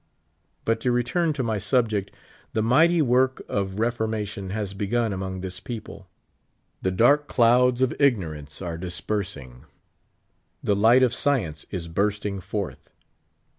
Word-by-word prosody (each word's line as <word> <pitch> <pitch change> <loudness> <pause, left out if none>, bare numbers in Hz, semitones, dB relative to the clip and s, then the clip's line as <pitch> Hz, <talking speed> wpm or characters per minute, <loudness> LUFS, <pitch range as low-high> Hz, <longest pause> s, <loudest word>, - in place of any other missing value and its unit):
But 115 0 +1
to 125 +2 0
return 155 +8 +1
to 140 -3 -2
my 110 -3 -1
subject. 110 -2 +1 0.4
The 110 - +1
mighty 160 +8 +4
work 130 +1 +2
of 100 -1 -2
fp 115 +4 0
formation 105 -4 -3
has 100 -1 -3
begun 105 +2 0
among 95 -1 -4
this 95 0 -6
people. 100 -2 -8 0.7
The 95 - +1
dark 140 +10 +4
cfouds 125 +1 +4
of 130 - +2
ignorance 80 - 0
are 85 -2 -4
dispersing. 85 - -4 1.0
The 100 - +2
light 115 +6 +5
o£ 125 -1 +3
science 105 - 0
j8 85 -4 -5
bursting 100 +1 -1
forth. 90 - -5
105 Hz, 135 wpm, -25 LUFS, 95-120 Hz, 1.0 s, light